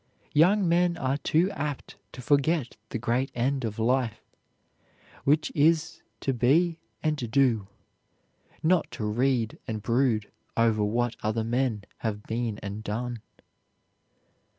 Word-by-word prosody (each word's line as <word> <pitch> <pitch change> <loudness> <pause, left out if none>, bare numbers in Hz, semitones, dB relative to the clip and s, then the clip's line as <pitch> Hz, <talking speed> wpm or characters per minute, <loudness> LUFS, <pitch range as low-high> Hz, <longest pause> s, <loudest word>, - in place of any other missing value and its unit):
Young 180 +6 +4
men 170 0 +3
are 135 -2 0
too 170 +6 +2
apt 150 -6 -4 0.2
to 125 - -9
forget 145 0 +2
the - - -3
great 120 +3 0
end 130 +3 0
of 110 -2 -3
life, 120 0 0 1.0
which 150 +3 +3
is 160 +2 +2 0.2
to 135 - 0
be 160 +8 +3 0.2
and 150 -7 -1
do, 120 -5 +2 1.0
not 175 +2 +3
to 110 - -4
read 120 +1 0
and 110 -2 -4
brood 115 -3 +1 0.3
over 115 -2 +3
what 120 +3 0
other 110 +1 0
men 120 -2 0 0.2
have 105 -2 -3
been 115 -2 -2
and 100 +2 -5
done." 115 +2 -3
125 Hz, 130 wpm, -27 LUFS, 110-150 Hz, 1.0 s, Young